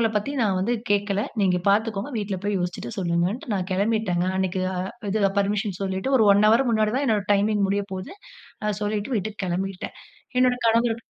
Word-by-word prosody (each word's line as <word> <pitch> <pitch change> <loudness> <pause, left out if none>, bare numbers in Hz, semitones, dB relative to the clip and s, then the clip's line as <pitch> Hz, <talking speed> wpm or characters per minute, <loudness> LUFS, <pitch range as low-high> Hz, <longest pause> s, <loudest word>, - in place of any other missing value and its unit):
மத்தவங்கள 225 - +3
பத்தி 210 +7 -1
நான் 195 -3 +1
வந்து 195 +6 0 0.2
கேட்கல. 205 0 +1 0.2
நீங்க 185 -2 +3
பார்த்துக்கோங்க. 215 +3 +1
வீட்ல 205 -2 -2
போய் 205 -1 0
யோச்சிட்டு 180 0 -4
சொல்லுங்கன்ட்டு, 175 +7 -1
நான் 185 -1 -2
கிளம்பிட்டங்க. 200 -3 +1
அன்னக்கி 190 0 -1
அ - - -4 0.3
இது 215 0 0 0.2
பர்மிஷன் 200 -1 0
சொல்லிட்டு, 190 +7 -1
ஒரு 220 - +5
ஒன் 200 +1 +4
ஹவர் 240 +3 +4
முன்னாடி 215 -1 +2
தான் 280 - +1
என்னோட 210 -3 +1
டைமிங் 205 0 +2
முடிய 200 0 0
போது. 185 - -6 0.5
அ 210 - +1
சொல்லிட்டு 210 +4 -2
வீட்டுக்கு 210 +1 -4
கிளம்பிட்டேன். 185 +1 -3 0.4
என்னோட 250 -1 +4
கணவர் 230 0 +2
205 Hz, 180 wpm, -24 LUFS, 190-220 Hz, 0.5 s, ஒரு